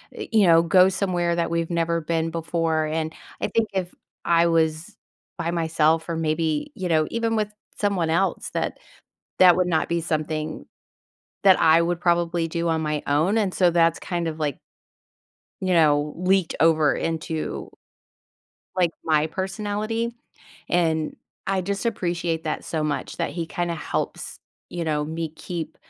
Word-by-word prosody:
eh, -, -, -5 dB
you 215 Hz, -4 st, +5 dB
know, 165 Hz, -1 st, +7 dB
go 180 Hz, +2 st, +6 dB
somewhere 180 Hz, -3 st, 0 dB
that 170 Hz, -1 st, 0 dB
we've 170 Hz, -1 st, -1 dB
never 170 Hz, -1 st, 0 dB
been 165 Hz, +1 st, -1 dB
before. 165 Hz, -1 st, 0 dB
And 160 Hz, +1 st, -2 dB, 0.3 s
I -, -, +1 dB
think 225 Hz, -1 st, +1 dB
if 185 Hz, -2 st, -2 dB, 0.3 s
I 170 Hz, 0 st, +4 dB
was 160 Hz, -1 st, 0 dB, 0.4 s
by 170 Hz, -1 st, -2 dB
myself 160 Hz, -1 st, +1 dB
or 170 Hz, -, -1 dB
maybe, 160 Hz, -, -1 dB
you 185 Hz, -, -3 dB
know, 155 Hz, -2 st, +3 dB
even 230 Hz, -1 st, 0 dB
with 210 Hz, -1 st, 0 dB, 0.3 s
someone 195 Hz, -6 st, 0 dB
else, 185 Hz, +4 st, 0 dB
that -, -, -2 dB, 0.6 s
that 180 Hz, -1 st, +7 dB
would 180 Hz, -1 st, +1 dB
not 160 Hz, -3 st, +1 dB
be 170 Hz, 0 st, 0 dB
something 155 Hz, -1 st, -3 dB, 0.8 s
that 190 Hz, -2 st, +6 dB
I 160 Hz, +1 st, +6 dB
would 170 Hz, 0 st, -1 dB
probably 170 Hz, -1 st, +1 dB
do 170 Hz, +1 st, -2 dB
on 160 Hz, -1 st, +1 dB
my 150 Hz, -1 st, -2 dB
own, 160 Hz, +9 st, +2 dB
and 200 Hz, -4 st, +1 dB
so 180 Hz, -2 st, +4 dB
that's 165 Hz, -1 st, +3 dB
kind 175 Hz, -2 st, -3 dB
of, 160 Hz, -1 st, -5 dB
like 145 Hz, -4 st, -1 dB, 1.0 s
you 185 Hz, -1 st, +1 dB
know, 150 Hz, -3 st, +3 dB
leaked 185 Hz, 0 st, +1 dB
over 155 Hz, -2 st, +4 dB
into, 160 Hz, -1 st, -3 dB, 1.1 s
like, 180 Hz, -2 st, +3 dB
my 155 Hz, -1 st, +2 dB
personality, 210 Hz, +6 st, -3 dB, 0.6 s
and 160 Hz, -3 st, +1 dB, 0.3 s
I 195 Hz, -1 st, +1 dB
just 200 Hz, +3 st, -3 dB
appreciate 170 Hz, -6 st, -1 dB
that 155 Hz, -, -3 dB
so 160 Hz, -2 st, -2 dB
much 150 Hz, -1 st, -3 dB
that 170 Hz, -, -1 dB
he 170 Hz, -2 st, -4 dB
kinda 175 Hz, +1 st, -2 dB
helps, 160 Hz, -, -4 dB, 0.3 s
you 175 Hz, -1 st, -3 dB
know, 150 Hz, -2 st, 0 dB
me 160 Hz, +1 st, -3 dB
keep, 165 Hz, +1 st, -6 dB
170 Hz, 160 wpm, -24 LUFS, 160-180 Hz, 1.1 s, know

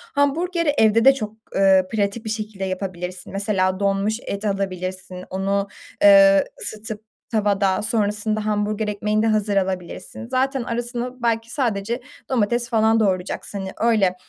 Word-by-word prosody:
Hamburgeri 335 Hz, +4 st, +1 dB
evde 220 Hz, +2 st, +4 dB
de 270 Hz, -, +9 dB
çok, 215 Hz, -5 st, -5 dB, 0.2 s
eee, 190 Hz, -1 st, +4 dB
pratik 215 Hz, +1 st, -1 dB
bir -, -, -3 dB
şekilde 215 Hz, -2 st, -4 dB
yapabilirsin. 185 Hz, -1 st, -5 dB
Mesela 195 Hz, -2 st, 0 dB
donmuş 200 Hz, +2 st, 0 dB
et 200 Hz, +2 st, -4 dB
alabilirsin. 185 Hz, -2 st, -3 dB
Onu, 195 Hz, +1 st, -1 dB, 0.3 s
eee, 195 Hz, -1 st, +7 dB, 0.2 s
ısıtıp 215 Hz, 0 st, -5 dB, 0.2 s
tavada 200 Hz, -3 st, +1 dB
sonrasında 215 Hz, -1 st, 0 dB
hamburger 210 Hz, 0 st, -1 dB
ekmeğini 210 Hz, +1 st, 0 dB
de 225 Hz, -, +2 dB
hazır 210 Hz, -2 st, +1 dB
alabilirsin. 190 Hz, +3 st, -3 dB
Zaten 260 Hz, +1 st, 0 dB
arasına 240 Hz, +1 st, -4 dB
belki 230 Hz, 0 st, 0 dB
sadece 235 Hz, -3 st, -1 dB, 0.3 s
domates 240 Hz, 0 st, 0 dB
falan 225 Hz, -1 st, +3 dB
doğrayacaksın. 195 Hz, 0 st, -1 dB
Hani, 190 Hz, 0 st, -5 dB
öyle 215 Hz, -6 st, +3 dB
210 Hz, 135 wpm, -22 LUFS, 195-230 Hz, 0.3 s, de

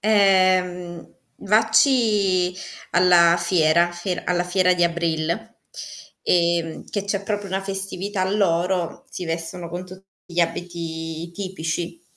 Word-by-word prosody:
Ehm, 185 Hz, -4 st, +2 dB, 0.2 s
vacci 215 Hz, -4 st, +3 dB, 0.4 s
alla 175 Hz, -1 st, +5 dB
fiera 170 Hz, -1 st, +3 dB
fie 175 Hz, +1 st, -4 dB
alla 175 Hz, 0 st, 0 dB
fiera 180 Hz, 0 st, +2 dB
di 175 Hz, -1 st, +2 dB
Abril, 170 Hz, -1 st, -1 dB, 0.9 s
ehm, 170 Hz, -2 st, +1 dB
che 200 Hz, -2 st, -3 dB
c'è 200 Hz, 0 st, -2 dB
proprio 205 Hz, 0 st, -3 dB
una 190 Hz, +1 st, -2 dB
festività 195 Hz, 0 st, -3 dB
loro, 180 Hz, -3 st, 0 dB
si 180 Hz, -, -6 dB
vestono 165 Hz, +1 st, -5 dB
con 175 Hz, +2 st, -6 dB
tutti 185 Hz, +1 st, -13 dB, 0.2 s
gli 175 Hz, 0 st, -1 dB
abiti 165 Hz, -1 st, -4 dB
tipici. 170 Hz, -2 st, -4 dB
180 Hz, 115 wpm, -22 LUFS, 170-195 Hz, 0.9 s, alla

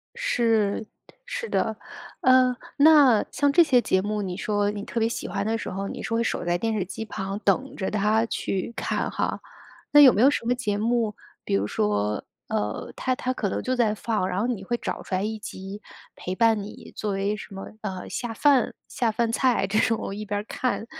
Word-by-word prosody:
是， 225 Hz, -, +1 dB, 0.4 s
是 480 Hz, -1 st, -5 dB
的。 -, -, 0 dB, 0.4 s
呃， 255 Hz, -1 st, +5 dB, 0.2 s
那 285 Hz, -7 st, +7 dB
像 285 Hz, -1 st, +2 dB
这 345 Hz, +4 st, +6 dB
些 265 Hz, -6 st, +4 dB
节 190 Hz, -5 st, +1 dB
目， 210 Hz, +1 st, -2 dB
你 185 Hz, -3 st, -3 dB
说 205 Hz, +1 st, 0 dB
你 205 Hz, -1 st, -6 dB
特 230 Hz, -, -3 dB
别 225 Hz, -, +2 dB
喜 230 Hz, -, -4 dB
欢 200 Hz, 0 st, -2 dB
的 225 Hz, +1 st, 0 dB
时 -, -, -5 dB
候， 195 Hz, +1 st, -4 dB
你 -, -, -6 dB
是 -, -, -3 dB
会 230 Hz, 0 st, +2 dB
守 225 Hz, -, -2 dB
在 175 Hz, 0 st, +1 dB
电 225 Hz, +4 st, -1 dB
视 210 Hz, -3 st, 0 dB
机 200 Hz, +4 st, -6 dB
旁 195 Hz, -1 st, -4 dB
等 215 Hz, +6 st, 0 dB
着 190 Hz, -, -2 dB
它 215 Hz, +2 st, +2 dB
去 195 Hz, -2 st, -3 dB
看 -, -, -1 dB
哈。 -, -, -2 dB, 0.5 s
那 295 Hz, -, +7 dB
有 270 Hz, -3 st, +10 dB
没 210 Hz, -, +1 dB
有 265 Hz, -, +7 dB
什 285 Hz, -, -2 dB
么 245 Hz, -, +2 dB
节 210 Hz, -5 st, -1 dB
目， 225 Hz, 0 st, 0 dB, 0.3 s
比 -, -, -3 dB
如 100 Hz, +1 st, +1 dB
说， 105 Hz, 0 st, 0 dB, 0.3 s
呃， 105 Hz, 0 st, -2 dB
它 255 Hz, -1 st, -1 dB
它 255 Hz, 0 st, -2 dB
可 205 Hz, -5 st, -2 dB
能 -, -, -2 dB
就 255 Hz, -, -1 dB
在 225 Hz, -4 st, +2 dB
放， 215 Hz, -3 st, -1 dB
然 185 Hz, 0 st, -2 dB
后 225 Hz, -, +1 dB
你 230 Hz, -6 st, -3 dB
会 240 Hz, +5 st, -1 dB
找 -, -, -4 dB
出 185 Hz, -, -3 dB
来 185 Hz, -, 0 dB
一 220 Hz, +1 st, -3 dB
集 195 Hz, 0 st, -8 dB, 0.3 s
陪 185 Hz, -, -5 dB
伴 225 Hz, 0 st, +3 dB
你 200 Hz, -, -10 dB
作 210 Hz, -, -2 dB
为 200 Hz, +2 st, 0 dB
什 210 Hz, -, -10 dB
么， 195 Hz, -, -7 dB
呃， 190 Hz, -3 st, -5 dB
下 240 Hz, -2 st, -4 dB
饭 275 Hz, +2 st, +3 dB, 0.2 s
下 235 Hz, -3 st, 0 dB
饭 230 Hz, +1 st, 0 dB
菜 245 Hz, -3 st, +2 dB
这 210 Hz, +3 st, +1 dB
种， 225 Hz, 0 st, +2 dB
我 -, -, -4 dB
一 210 Hz, +1 st, -5 dB
边 205 Hz, 0 st, -2 dB
儿 -, -, -14 dB
看， 250 Hz, -3 st, -2 dB
215 Hz, 235 characters per minute, -25 LUFS, 200-240 Hz, 0.5 s, 有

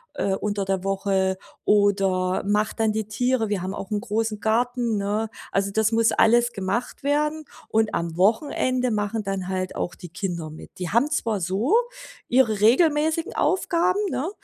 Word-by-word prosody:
äh, 195 Hz, -1 st, 0 dB
unter 205 Hz, -1 st, -2 dB
der 190 Hz, -1 st, -1 dB
Woche 195 Hz, -1 st, 0 dB, 0.3 s
oder 195 Hz, -3 st, +2 dB
mache 210 Hz, +1 st, +1 dB
dann 220 Hz, -1 st, +1 dB
die 215 Hz, -1 st, -2 dB
Tiere. 225 Hz, 0 st, 0 dB
Wir 195 Hz, -3 st, -1 dB
haben 190 Hz, +1 st, -3 dB
auch 195 Hz, -, -7 dB
'n 210 Hz, -, 0 dB
großen 220 Hz, -1 st, -2 dB
Garten, 235 Hz, 0 st, 0 dB
ne? 210 Hz, +2 st, -1 dB, 0.2 s
Also, 195 Hz, 0 st, 0 dB
das 220 Hz, +1 st, +1 dB
muss 225 Hz, 0 st, +3 dB
alles 240 Hz, +1 st, +3 dB
gemacht 200 Hz, +6 st, -3 dB
werden 300 Hz, +2 st, 0 dB, 0.2 s
und 220 Hz, -1 st, +1 dB
am 170 Hz, -1 st, -3 dB
Wochenende 250 Hz, +4 st, +1 dB
machen 210 Hz, +1 st, -1 dB
dann 195 Hz, -2 st, -3 dB
halt 185 Hz, -1 st, -3 dB
auch 175 Hz, -, -3 dB
die 175 Hz, -, -11 dB
Kinder 170 Hz, -3 st, -4 dB
mit. 155 Hz, -, -11 dB
Die 180 Hz, -2 st, -3 dB
haben 240 Hz, +7 st, +3 dB
zwar 225 Hz, -9 st, -1 dB
so 195 Hz, -, 0 dB, 0.5 s
ihre 230 Hz, -5 st, +2 dB
regelmäßigen 310 Hz, +7 st, +3 dB
Aufgaben, 365 Hz, +3 st, +1 dB
ne, 305 Hz, +8 st, -2 dB
215 Hz, 165 wpm, -24 LUFS, 195-245 Hz, 0.5 s, muss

